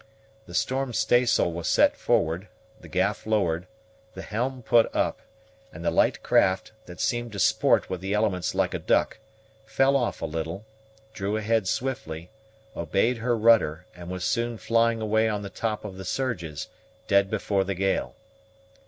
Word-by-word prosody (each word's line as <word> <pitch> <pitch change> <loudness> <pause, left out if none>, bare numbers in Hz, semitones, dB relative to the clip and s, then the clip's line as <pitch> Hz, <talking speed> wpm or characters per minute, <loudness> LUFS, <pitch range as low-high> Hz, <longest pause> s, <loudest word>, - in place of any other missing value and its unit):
The 90 - -9
storm 130 +5 0
staysail 120 -7 +3
was 85 0 -4
set - - +4
forward, 85 +6 0 0.3
the - - -13
gaff 100 +4 -1
lowered, 90 -5 0 0.5
the - - -7
helm 125 +4 -3
put 115 0 +4
up, - - 0 0.5
and 85 +2 -9
the - - +2
light - - +2
craft, 95 0 +2 0.2
that 90 0 -11
seemed 120 -2 -1
to 100 - -5
sport - - +3
with 90 -1 -5
the 95 +2 -1
elements 100 -5 0
like - - +1
a - - -2
duck, - - +1 0.4
fell 135 +5 +2
off 125 -3 0
a - - -3
little, 80 +5 -4 0.5
drew 105 0 -2
ahead 110 -2 0
swiftly, 90 -9 -3 0.4
obeyed 100 +9 +1
her 120 +1 0
rudder, 105 -7 +3
and 90 0 -9
was 90 0 -4
soon 115 +3 -1
flying 115 0 +1
away 110 +1 +2
on 105 -1 -2
the 100 - -7
top 110 -2 -3
of 95 -3 -7
the 95 - -7
surges, 90 - -3 0.4
dead 100 -1 +3
before 100 -2 0
the 95 0 -3
gale. 95 +2 -1
105 Hz, 165 wpm, -26 LUFS, 90-115 Hz, 0.5 s, set